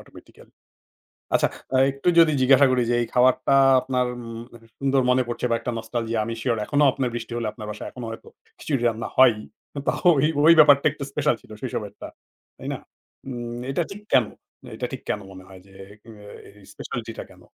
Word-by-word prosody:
Automatically. -, -, -17 dB, 0.8 s
আচ্ছা -, -, +3 dB, 0.3 s
আ -, -, +4 dB
একটু 140 Hz, +5 st, -7 dB
যদি 160 Hz, -2 st, +6 dB
জিজ্ঞাসা 135 Hz, +2 st, +6 dB
করি 125 Hz, -1 st, +2 dB
যে, 120 Hz, -, +2 dB
এই 115 Hz, -, -2 dB
খাবারটা 130 Hz, +2 st, +3 dB, 0.3 s
আপনার 125 Hz, -1 st, -1 dB
উম 115 Hz, -1 st, -8 dB, 0.4 s
সুন্দর 135 Hz, -1 st, +2 dB
মনে 125 Hz, 0 st, +3 dB
পড়ছে 120 Hz, +1 st, -3 dB
বা -, -, +3 dB
একটা 125 Hz, -, -4 dB
নস্টালজিয়া, 115 Hz, 0 st, -3 dB
আমি 115 Hz, -, -4 dB
সিওর 120 Hz, -3 st, 0 dB
এখনও 145 Hz, 0 st, +2 dB
আপনার 130 Hz, -2 st, -2 dB
বৃষ্টি 115 Hz, 0 st, -6 dB
হলে 115 Hz, -, -2 dB
আপনার 105 Hz, -, -10 dB
বাসায় 105 Hz, -, -8 dB
এখনো 125 Hz, -2 st, -8 dB
হয়তো 115 Hz, -, -10 dB, 0.3 s
খিচুড়ি 135 Hz, -6 st, -2 dB
রান্না 110 Hz, -1 st, -3 dB
হয়ই। 120 Hz, -5 st, +5 dB, 0.5 s
তো -, -, +4 dB, 0.3 s
ওই, 135 Hz, -, +3 dB, 0.2 s
ওই 165 Hz, -, +9 dB
ব্যাপারটা 145 Hz, -2 st, +6 dB
একটু 150 Hz, -2 st, -8 dB
স্পেশাল 150 Hz, -2 st, +1 dB
ছিল -, -, -18 dB
শৈশবের 105 Hz, -5 st, -5 dB
টা, -, -, -6 dB, 0.5 s
তাই -, -, -9 dB
না? -, -, -6 dB, 0.5 s
উম 120 Hz, -2 st, -6 dB
এইটা 155 Hz, +5 st, 0 dB
ঠিক 205 Hz, +1 st, -9 dB
কেন 125 Hz, -, +5 dB, 0.5 s
এইটা -, -, -4 dB
ঠিক -, -, -6 dB
কেন 105 Hz, -, -1 dB
মনে 95 Hz, 0 st, -12 dB
হয় 95 Hz, -1 st, -14 dB
যে 95 Hz, -, -19 dB, 0.3 s
অ্যা 105 Hz, -3 st, -14 dB, 0.2 s
এই 100 Hz, -, -19 dB, 0.2 s
স্পেশালিটি -, -, -6 dB
টা -, -, -4 dB
কেন? -, -, -18 dB
125 Hz, 195 wpm, -23 LUFS, 115-135 Hz, 0.8 s, ওই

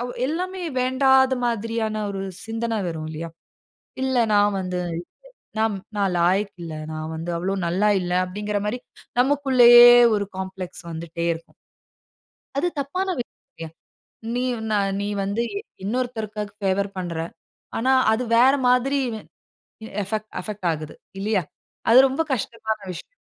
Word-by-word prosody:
ஒ -, -, -5 dB, 0.2 s
எல்லாமே 365 Hz, +5 st, -3 dB, 0.2 s
வேண்டாத 265 Hz, +1 st, +4 dB
மாதிரியான 225 Hz, -1 st, -1 dB
ஒரு 195 Hz, -1 st, -4 dB, 0.2 s
சிந்தன 225 Hz, -1 st, -2 dB
வரும், 160 Hz, -2 st, -4 dB
இல்லையா. 160 Hz, +1 st, -5 dB, 0.8 s
"இல்ல, 260 Hz, -1 st, +1 dB, 0.2 s
நான் 205 Hz, -1 st, +4 dB
வந்து 180 Hz, -1 st, -3 dB, 0.8 s
நா -, -, +3 dB, 0.3 s
நான் 195 Hz, -2 st, +1 dB
லாயக்கு 190 Hz, +3 st, +1 dB
இல்ல. 165 Hz, -2 st, -6 dB, 0.2 s
நான் 155 Hz, 0 st, -5 dB
வந்து 165 Hz, +2 st, -4 dB
அவ்வளோ 190 Hz, +3 st, -1 dB
நல்லா 195 Hz, +5 st, +2 dB
இல்லை 180 Hz, 0 st, 0 dB
அப்பிடீங்கிற 205 Hz, +3 st, -3 dB
மாரி, 245 Hz, +4 st, -2 dB, 0.4 s
நமக்குள்ளேயே 250 Hz, -3 st, +7 dB, 0.3 s
ஒரு 200 Hz, -1 st, -2 dB
காம்ப்ளக்ஸ் 190 Hz, -1 st, -6 dB
வந்துட்டே 165 Hz, +1 st, -4 dB
இருக்கும். 165 Hz, 0 st, -12 dB, 1.0 s
அது 310 Hz, -, +1 dB
தப்பான 365 Hz, +8 st, -2 dB
விஷயமில்லியா. 165 Hz, -8 st, -10 dB, 0.7 s
நீ 250 Hz, -, 0 dB, 0.3 s
நா -, -, +2 dB, 0.3 s
நீ 205 Hz, -, -2 dB, 0.2 s
வந்து 200 Hz, +4 st, -1 dB
இ -, -, -1 dB, 0.3 s
இன்னொருத்தருக்கா 220 Hz, -1 st, -2 dB, 0.2 s
ஃபேவர் 200 Hz, 0 st, 0 dB
பண்ணுற. 175 Hz, -3 st, -3 dB, 0.6 s
ஆனா 255 Hz, +3 st, +2 dB, 0.2 s
அது 240 Hz, +3 st, 0 dB
வேறு 260 Hz, +4 st, +6 dB
மாரி 250 Hz, +3 st, +3 dB, 0.2 s
எ -, -, -12 dB, 0.8 s
எ -, -, -3 dB
ஃபெக்ட் 215 Hz, +1 st, -3 dB
அஃபெக்ட் 200 Hz, 0 st, -5 dB
ஆகுது 155 Hz, -1 st, -6 dB, 0.2 s
இல்லையா? 200 Hz, -2 st, +1 dB, 0.5 s
அது 240 Hz, -, +8 dB
ரொம்ப 270 Hz, +5 st, 0 dB
கஷ்டமான 220 Hz, -2 st, -2 dB
விஷயம். -, -, -11 dB
210 Hz, 135 wpm, -23 LUFS, 185-250 Hz, 1.0 s, அது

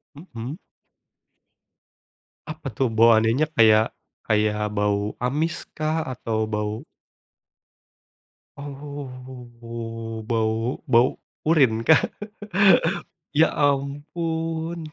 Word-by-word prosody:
Mhm. 140 Hz, -3 st, -8 dB, 1.9 s
Apa -, -, -7 dB
tuh, 130 Hz, -4 st, +1 dB
bau 115 Hz, +1 st, +6 dB
anehnya 115 Hz, +7 st, +2 dB
kayak 110 Hz, -1 st, +5 dB, 0.3 s
kayak 105 Hz, 0 st, +1 dB
bau 105 Hz, 0 st, 0 dB
amis 150 Hz, +6 st, -1 dB
kah 155 Hz, +1 st, 0 dB
atau 115 Hz, -3 st, -2 dB
bau 105 Hz, +2 st, -3 dB, 1.7 s
Oh, 125 Hz, -5 st, -8 dB
bau 115 Hz, +1 st, 0 dB
bau, 125 Hz, -3 st, +5 dB, 0.4 s
urine 130 Hz, -9 st, +4 dB
kah? 160 Hz, -, +7 dB, 1.3 s
Ya 160 Hz, +2 st, +6 dB, 0.2 s
ampun! 160 Hz, +4 st, -2 dB
120 Hz, 75 wpm, -24 LUFS, 110-145 Hz, 1.9 s, kah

